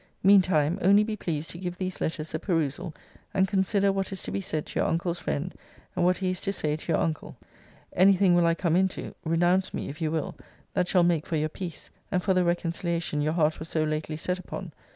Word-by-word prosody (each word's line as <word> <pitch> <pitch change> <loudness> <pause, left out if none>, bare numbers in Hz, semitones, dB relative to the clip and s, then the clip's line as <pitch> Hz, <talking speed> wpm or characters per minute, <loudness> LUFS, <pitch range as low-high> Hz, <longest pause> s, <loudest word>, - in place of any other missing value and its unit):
Mean 195 +1 +8
time, 160 -3 +1
only 200 +3 +6
be 215 0 -2
pleased 160 -6 -3
to 170 - -9
give 180 -1 -4
these 185 -1 -4
letters 160 -1 -3
a 155 - -1
perusal, 165 -1 -1 0.4
and 190 0 +4
consider 195 +1 +2
what 195 0 -2
is 190 - -5
to - - -4
be 100 +1 -2
said 155 +8 -3
to - - -4
your - - +2
uncle's 170 +1 -1
friend, 165 +6 -3 0.4
and 180 - +1
what 180 +1 +3
he 185 -2 0
is 185 - -4
to 195 - -1
say 150 -6 -1
to 155 +2 -5
your 155 - +3
uncle. 160 -2 -2 0.6
Any 195 +2 +6
thing 190 -1 +4
will 175 -1 +4
I 165 - +3
come 170 -2 +1
into, 190 +1 0
(renounce 175 +3 +2
me, - - -4
if 145 +3 -9
you 160 - +1
will,) 160 -1 -2 0.4
that 180 - +1
shall 180 -1 +4
make 170 -3 +1
for 165 - -1
your 155 0 0
peace, 170 0 -7 0.2
and 180 -2 +1
for 195 - +3
the 185 0 +3
reconciliation 170 -2 -1
your 155 +1 +1
heart 155 -2 +2
was 160 +1 -7
so 155 - +1
lately 155 0 -2
set 180 +3 -2
upon. 185 -1 -7
175 Hz, 235 wpm, -27 LUFS, 155-185 Hz, 0.6 s, Mean